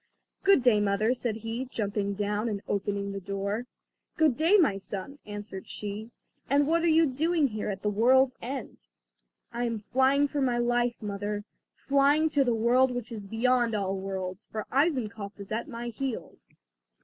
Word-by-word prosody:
"Good 390 -9 +5
day, 235 -4 +5
mother," 205 +3 +2
said 240 -3 -2
he, 225 +3 -4
jumping 205 -4 -2
down 210 +2 -1
and 205 -2 -4
opening 200 0 -1
the 195 - -4
door. 200 +4 -3 0.5
"Good 310 -6 +4
day, 330 - +4
my 280 - +3
son," 200 +8 -6
answered 205 -2 -7
she, 210 +2 -5 0.4
"and 285 +2 +4
what 330 +3 +2
are 340 - +2
you 325 0 +5
doing 310 +2 +1
here, 215 -1 -3
at 195 -1 -5
the 210 - +2
world's 255 +5 +4
end?" 255 -1 -6 0.7
"I 240 +1 -1
am 230 -3 -3
flying 270 +2 +4
for 285 0 -2
my 250 -2 +1
life, 240 0 +1
mother, 205 0 -3 0.3
flying 285 +3 +3
to 285 -2 +3
the 240 -3 +1
world 245 +4 +4
which 245 -1 -5
is 210 -3 -6
beyond 235 +2 +1
all 195 -2 -1
worlds; 190 0 -5
for 215 -1 -4
Eisenkopf 230 -9 0
is 200 +1 -9
at 225 +5 -2
my 240 -3 -5
heels." 255 +1 -6
230 Hz, 175 wpm, -28 LUFS, 205-265 Hz, 0.7 s, Good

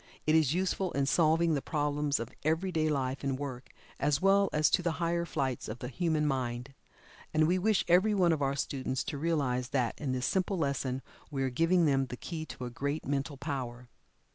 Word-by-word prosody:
It 155 - +3
is 160 -2 +4
useful 185 0 0
in 140 -1 +1
solving 165 +2 +3
the 140 - 0
problems 145 -1 0
of 115 +1 -6
every 165 +5 +1
day 155 -2 +1
life 135 -2 -1
and 135 -1 -1
work, 130 -3 -6 0.3
as 145 0 +2
well 195 0 +4
as 150 0 +3
to - - +3
the 170 -2 0
higher 170 0 0
flights 135 -7 -2
of 110 - -5
the 125 - -6
human 155 +2 0
mind. 125 -2 -2 0.6
And 155 0 +5
we 180 +2 +2
wish 215 +1 +2
every 190 +5 +4
one 175 -4 +4
of 155 - -2
our 140 0 +1
students 130 -1 -2
to 145 - -4
realize 140 -6 0
that 125 -1 -1
in 140 -3 -1
this 130 0 -1
simple 190 0 0
lesson 135 -4 -1 0.3
we 135 -2 -2
are 130 - 0
giving 165 +6 +3
them 135 -2 +2
the 125 - -7
key 160 +1 -6
to 125 - -7
a 120 - -5
great 140 +5 -3
mental 140 0 -2
power. 125 -4 -5
145 Hz, 210 wpm, -31 LUFS, 130-165 Hz, 0.6 s, And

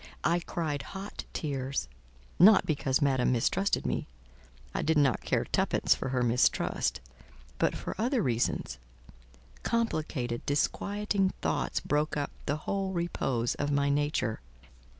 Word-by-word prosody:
I 170 +1 +3
cried 160 -4 -3 0.2
hot 200 +2 -7
tears: 135 - -2 0.5
not 205 +3 +8
because 140 -2 +1
Madame 130 -3 +2
mistrusted 160 +11 +1
me—I - - -6
did 160 0 +2
not 140 -5 +3
care - - 0
twopence - - +2
for - - -4
her 125 -1 +1
mistrust—but 65 - -1
for - - -4
other 240 0 +1
reasons. 115 - -1 0.8
Complicated, 155 - -1
disquieting 200 +6 0
thoughts - - 0
broke 150 +1 0
up 145 - -2 0.2
the 145 - 0
whole 195 -1 -1
repose 135 -9 -1
of 145 - -2
my 140 0 +2
nature. 145 -6 0
145 Hz, 120 wpm, -30 LUFS, 120-175 Hz, 0.8 s, not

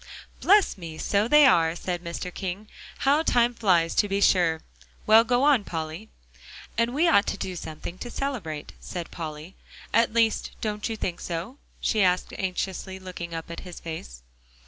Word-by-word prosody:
"Bless 400 - +4
me! 165 -2 -7
so 205 +5 +1
they 295 +3 +7
are," 165 -9 +4
said 175 -1 -4
Mr. 170 +1 -5
King. 195 +2 -5 0.4
"How 285 +3 +4
time 240 -6 +3
flies, 180 -7 +2
to 205 - +2
be 195 +1 0
sure! 170 -5 +3 0.4
Well, 220 +1 +7
go 245 +2 +1
on, 280 -7 +4
Polly." 165 +4 -5 0.7
"And 230 +2 0
we 330 +4 +3
ought 200 -11 +4
to - - -2
do 185 - -4
something 170 +2 -7
to 240 - -6
celebrate," 205 - -4
said 175 -2 -6
Polly, 155 +1 -7 0.4
"at 230 +1 +4
least 230 -1 +1
don't 210 0 -3
you 225 - -3
think 180 -4 -3
so?" 180 - -5 0.2
she 215 - +1
asked 180 -1 +2
anxiously, 190 0 -3
looking 180 -3 -7
up 165 +1 -6
in 170 - -6
his 180 -2 -9
face. - - -8
190 Hz, 170 wpm, -26 LUFS, 170-230 Hz, 0.7 s, they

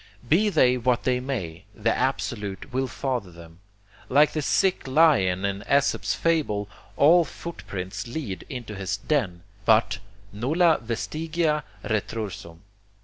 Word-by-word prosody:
Be 200 - +4
they 130 -9 +4
what 125 0 +1
they 125 -1 +1
may, 100 -11 -4
the 110 +2 +1
Absolute 120 -4 -2
will 130 +1 0
father 125 -6 -3
them. 85 0 -14 0.5
Like 145 +3 +5
the 155 - -2
sick 185 +2 +1
lion 130 - +4
in 100 0 -2
Esop's 140 0 +2
fable, 145 -12 0 0.3
all 170 +4 +6
footprints 100 - -6
lead 115 - -5
into 120 -5 -6
his 95 -1 -3
den, 100 - -1 0.2
but 110 0 +3 0.3
nulla 155 - +2
vestigia 155 +6 -1 0.2
retrorsum. 105 -6 -4
125 Hz, 125 wpm, -25 LUFS, 100-150 Hz, 0.5 s, all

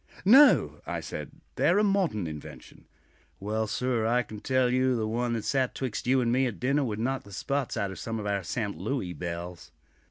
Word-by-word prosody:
"No," 270 +9 +6
I - - -2
said; - - -6 0.3
"they - - +2
are - - +4
a 210 - +4
modern 190 - +1
invention." 75 -2 -10 0.5
"Well, 110 +2 -2
sir, 120 -1 0
I 125 +2 +2
can 110 -3 -9
tell 130 +1 +1
you 130 0 +2
the 110 -2 -1
one 120 +2 -1
that 115 -2 -3
sat 130 -2 0
'twixt 125 -3 -4
you 130 0 +4
and 120 -1 +1
me 130 +2 +2
at 105 -8 -6
dinner 140 +3 +1
would 110 -5 -2
knock 130 +4 -1
the 100 - -15
spots 140 +6 -2
out 100 -3 -1
of 95 - -8
some 115 -1 -4
of 105 - -5
our 100 -1 0
'Sent' 100 -1 -3
Louis 95 -3 -2
belles." 85 +1 -6
115 Hz, 215 wpm, -28 LUFS, 100-130 Hz, 0.5 s, No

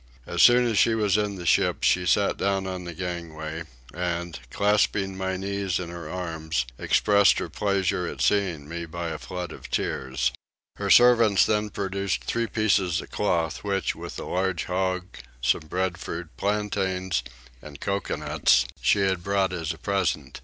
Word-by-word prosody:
As 85 - -1
soon 125 0 +7
as 115 -4 +2
she 115 - +4
was 105 -3 +2
in 105 -1 0
the 90 -2 -7
ship - - +2
she 90 -1 +3
sat 70 - +3
down 95 -1 0
on 90 -1 -5
the 85 - -6
gangway 85 -2 -5 0.3
and, 85 -1 -3
clasping 100 - +1
my 95 0 -2
knees 100 -1 -2
in 90 -2 -5
her 85 -3 -7
arms, 80 -7 -2
expressed 100 -1 +4
her - - -3
pleasure 95 -3 0
at - - -6
seeing 90 -8 +1
me 85 +1 -5
by 85 +1 -4
a 80 -2 -5
flood 90 0 -6
of - - -10
tears. 65 -1 -1 0.5
Her - - -2
servants 115 -5 +6
then 105 0 0
produced 100 -1 -2
three 115 0 -1
pieces 95 -5 +1
of - - -9
cloth 85 -6 -1
which, 100 -1 0
with - - -8
a - - -5
large 95 -2 -1
hog, 90 0 -1 0.3
some 65 +5 +1
breadfruit, 90 -2 -3
plantains, 95 -3 -1 0.4
and 75 -2 -11
coconuts, 100 -10 +1 0.2
she 100 - +3
had 95 -3 0
brought 95 -1 +1
as 85 -2 -2
a 80 - -7
present. 80 -7 -1
95 Hz, 165 wpm, -25 LUFS, 85-100 Hz, 0.5 s, soon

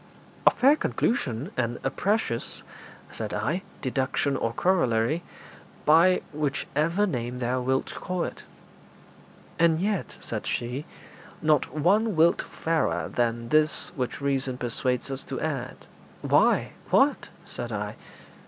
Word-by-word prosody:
'A - - +13
fair 275 +4 +4
conclusion, 155 - -1
and 120 -1 -1
a 135 - 0
precious,' 200 - -1 0.5
said - - -4
I, 175 +5 -1 0.2
'deduction 135 +1 0
or 115 -3 -1
corollary, 130 -2 +2 0.6
by 170 +4 +5
whichever 150 +5 0
name 125 - -3
thou 125 +1 -1
wilt 130 +1 0
call 180 -1 -3
it.' - - -5 1.2
'And 165 -1 +4
yet,' 200 0 -1
said - - -5
she, 125 +5 -2 0.5
'not 155 -2 +2
one 200 +8 +2
whit 165 +2 +4
fairer 165 0 -1
than 115 -1 -1
this 155 +3 +3
which 125 -4 -3
reason 135 -2 -1
persuades 125 +2 -1
us 135 0 -4
to 130 - -4
add.' 135 -5 -4 0.4
'Why, - - +3 0.2
what?' - - +3 0.2
said - - -6
I. - - -3
140 Hz, 125 wpm, -26 LUFS, 125-170 Hz, 1.2 s, A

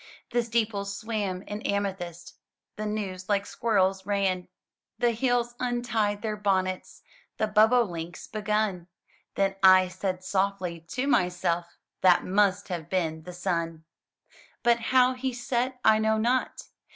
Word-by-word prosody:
The 240 - +2
steeples 215 -4 -1
swam 205 -4 -3
in 210 +1 -6
amethyst. 190 -5 -3 0.4
The 215 0 -4
news 195 -3 -4
like 200 -1 +1
squirrels 195 -5 +1
ran. 190 -2 0 0.5
The 240 -1 +2
hills 240 0 0
untied 230 -4 -1
their 215 -1 -1
bonnets. 190 -3 -1 0.3
The 215 - +1
bobolinks 210 -6 +2
begun. 210 -4 -1 0.5
Then 195 0 +1
I 185 -1 +7
said 185 0 -3
softly 190 -3 -1
to 255 +9 -2
myself, 175 -7 0 0.2
*That 180 -2 +5
must 200 +1 +2
have 170 -3 -5
been 160 -4 -1
the 180 - -8
sun!" 170 -3 -2 0.8
But 235 -1 +4
how 255 +2 +3
he 255 0 -3
set, 250 +1 -2
I 220 0 +6
know 220 0 +2
not. 245 +4 0
200 Hz, 130 wpm, -27 LUFS, 185-225 Hz, 0.8 s, I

